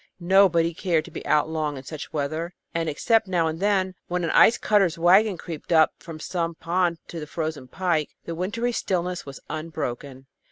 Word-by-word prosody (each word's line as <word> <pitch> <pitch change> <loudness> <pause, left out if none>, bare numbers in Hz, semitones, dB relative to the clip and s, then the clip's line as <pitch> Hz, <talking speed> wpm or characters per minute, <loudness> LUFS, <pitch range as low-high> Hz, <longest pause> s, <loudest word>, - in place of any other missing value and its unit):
Nobody 175 -2 +4
cared 165 -2 0
to - - -12
be - - -7
out 150 0 +3
long 155 -3 -2
in 130 - -8
such 150 +2 -8
weather, 155 +4 -3 0.2
and 165 -1 -1
except 220 +8 +2
now 175 -3 +1
and 160 0 -2
then, 190 -2 +1
when 180 0 -2
an 165 - 0
ice 230 - +6
cutter's 195 -5 +2
wagon 190 +4 +4
creaked 165 -1 -8
up 160 -2 +5
from 165 -3 -9
some 170 0 -2
pond 170 0 0
to 170 - -6
the 150 - -7
frozen 155 -4 -4
pike, 165 0 0 0.2
the 170 - -4
wintry 210 +8 -2
stillness 180 -7 -2
was 135 - -8
unbroken. 140 -4 -5
165 Hz, 190 wpm, -25 LUFS, 155-185 Hz, 0.2 s, ice